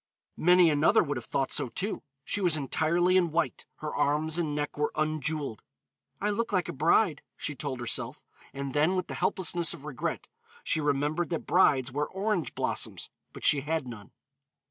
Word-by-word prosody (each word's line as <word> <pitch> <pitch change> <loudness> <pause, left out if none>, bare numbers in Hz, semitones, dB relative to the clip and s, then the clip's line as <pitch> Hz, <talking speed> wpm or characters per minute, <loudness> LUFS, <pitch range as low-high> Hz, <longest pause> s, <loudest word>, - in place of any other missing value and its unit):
Many 180 -1 +6
another 145 +1 +4
would 145 -3 -2
have 120 - -7
thought 135 - -1
so, - - +1
too. 200 - -3 0.2
She 205 - -1
was 175 -4 +3
entirely 170 +6 +2
in 175 -2 +3
white; 165 +2 -1
her 155 -1 -4
arms 155 +3 +1
and 155 -4 -1
neck 145 0 -2
were 150 0 0
unjeweled. 155 -5 -1 0.6
"I 210 +1 0
look 230 +3 -1
like 185 -4 +1
a - - -4
bride," 160 +4 +3 0.2
she 150 - -4
told 135 -2 -4
herself, 120 -1 -3 0.3
and 140 -1 -5
then, 155 +6 +3
with 185 -1 0
the - - -7
helplessness 175 -2 0
of 150 -3 -13
regret, 145 -5 -4 0.4
she 160 - 0
remembered 150 +4 0
that 165 - -3
brides 135 -8 +3
wear 145 +3 -1
orange 195 -2 -2
blossoms, - - -3 0.2
but - - -7
she 145 - +5
had 155 -1 -2
none. 105 -5 -9
155 Hz, 180 wpm, -29 LUFS, 145-175 Hz, 0.6 s, Many